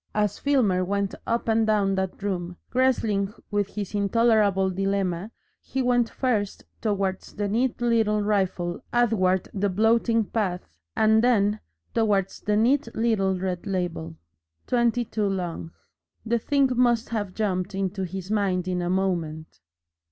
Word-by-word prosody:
As 210 Hz, -1 st, 0 dB
Filmer 225 Hz, -11 st, +2 dB
went 200 Hz, +1 st, -1 dB
up 230 Hz, +1 st, -1 dB
and 225 Hz, 0 st, +2 dB
down 205 Hz, -2 st, +2 dB
that 190 Hz, 0 st, -3 dB
room 175 Hz, -3 st, -3 dB, 0.2 s
wrestling 220 Hz, -6 st, +1 dB, 0.2 s
with 205 Hz, -1 st, -1 dB
his 205 Hz, -2 st, -4 dB
intolerable 205 Hz, -2 st, +3 dB
dilemma 195 Hz, 0 st, -1 dB, 0.3 s
he 265 Hz, +1 st, -2 dB
went 245 Hz, -2 st, +2 dB
first 220 Hz, -6 st, -1 dB, 0.2 s
towards 195 Hz, -4 st, -2 dB
the 205 Hz, 0 st, -1 dB
neat 235 Hz, +5 st, 0 dB
little 225 Hz, -3 st, +2 dB
rifle 190 Hz, -4 st, -1 dB
athwart 200 Hz, -6 st, +2 dB
the 205 Hz, 0 st, 0 dB
blotting 225 Hz, +3 st, +2 dB
pad 195 Hz, -4 st, -2 dB, 0.3 s
and 220 Hz, +1 st, +4 dB
then 215 Hz, -4 st, +3 dB, 0.3 s
towards 205 Hz, -4 st, +1 dB
the 210 Hz, 0 st, +1 dB
neat 265 Hz, +7 st, +3 dB
little 200 Hz, -5 st, +1 dB
red 180 Hz, +1 st, -3 dB
label 175 Hz, -4 st, -3 dB, 0.5 s
".22 235 Hz, -3 st, +1 dB
LONG." 175 Hz, -3 st, -4 dB, 0.6 s
The 235 Hz, +1 st, +1 dB
thing 275 Hz, +2 st, +2 dB
must 240 Hz, -1 st, +2 dB
have 205 Hz, -5 st, -3 dB
jumped 195 Hz, -3 st, -1 dB
into 195 Hz, 0 st, -2 dB
his 185 Hz, +2 st, -5 dB
mind 190 Hz, -4 st, 0 dB
in 180 Hz, -1 st, -1 dB
a 175 Hz, -, -2 dB
moment. 170 Hz, -, -2 dB
205 Hz, 135 wpm, -25 LUFS, 190-225 Hz, 0.6 s, and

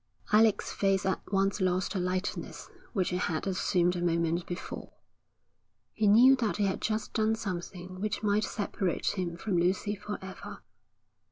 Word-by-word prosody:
Alec's 215 Hz, -1 st, +4 dB
face 195 Hz, -1 st, +1 dB
at 190 Hz, -, 0 dB
once 195 Hz, +1 st, +1 dB
lost 185 Hz, +1 st, +1 dB
the 195 Hz, -, -1 dB
lightness 185 Hz, +2 st, -3 dB, 0.2 s
which 185 Hz, -4 st, 0 dB
it 180 Hz, -, 0 dB
had 160 Hz, -3 st, -1 dB
assumed 180 Hz, -2 st, +1 dB
a 175 Hz, -, -3 dB
moment 170 Hz, 0 st, 0 dB
before. 175 Hz, -, -6 dB, 1.0 s
He 215 Hz, -1 st, +1 dB
knew 245 Hz, +6 st, +8 dB
that 230 Hz, -5 st, -1 dB
he 205 Hz, -, +2 dB
had 190 Hz, -, -1 dB
just 215 Hz, 0 st, -2 dB
done 220 Hz, 0 st, +2 dB
something 185 Hz, -3 st, -6 dB
which 210 Hz, +1 st, -2 dB
might 210 Hz, +1 st, +2 dB
separate 195 Hz, -4 st, -1 dB
him 175 Hz, -3 st, -3 dB
from 185 Hz, -1 st, 0 dB
Lucy 185 Hz, +4 st, +1 dB
for 205 Hz, +1 st, -5 dB
ever. 200 Hz, +1 st, -9 dB
190 Hz, 160 wpm, -30 LUFS, 180-210 Hz, 1.0 s, knew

